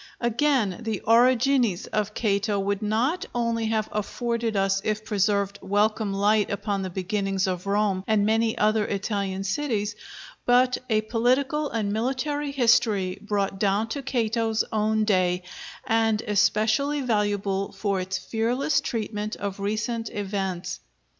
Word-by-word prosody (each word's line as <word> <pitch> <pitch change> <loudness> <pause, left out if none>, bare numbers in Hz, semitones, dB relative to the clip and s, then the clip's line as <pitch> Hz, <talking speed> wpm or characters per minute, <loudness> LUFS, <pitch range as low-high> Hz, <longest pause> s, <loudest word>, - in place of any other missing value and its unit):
Again, 235 -4 +1
the 220 -4 -2
'Origines' 245 -3 +3
of 210 0 -2
Cato 205 -1 0
would 200 +1 -1
not 230 +11 0
only 230 -1 0
have 220 -1 0
afforded 230 +1 -2
us, 195 0 +1
if 215 0 -2
preserved, 200 -1 0
welcome 210 +1 +1
light 205 +2 +2
upon 200 0 -2
the 190 - -3
beginnings 195 +1 -1
of 185 0 -3
Rome 200 -2 +1
and 215 -2 +3
many 225 +1 +1
other 215 0 +2
Italian 195 -1 -2
cities, 210 0 -1 0.5
but 250 +1 +3
a 215 -1 +3
political 260 +7 +1
and 210 -3 -1
military 270 +6 -1
history, 230 -8 +2
brought 200 -2 -2
down 205 +2 +1
to 280 - -3
Cato's 230 -4 0
own 215 0 +1
day, 185 -3 +1 0.4
and 225 -1 +2
especially 220 +8 +2
valuable 205 -4 0
for 200 -3 -1
its 190 +1 -3
fearless 230 +9 0
treatment 215 -2 -3
of 200 -1 -5
recent 215 +3 -2
events. 190 -3 -3
215 Hz, 135 wpm, -25 LUFS, 200-230 Hz, 0.5 s, Origines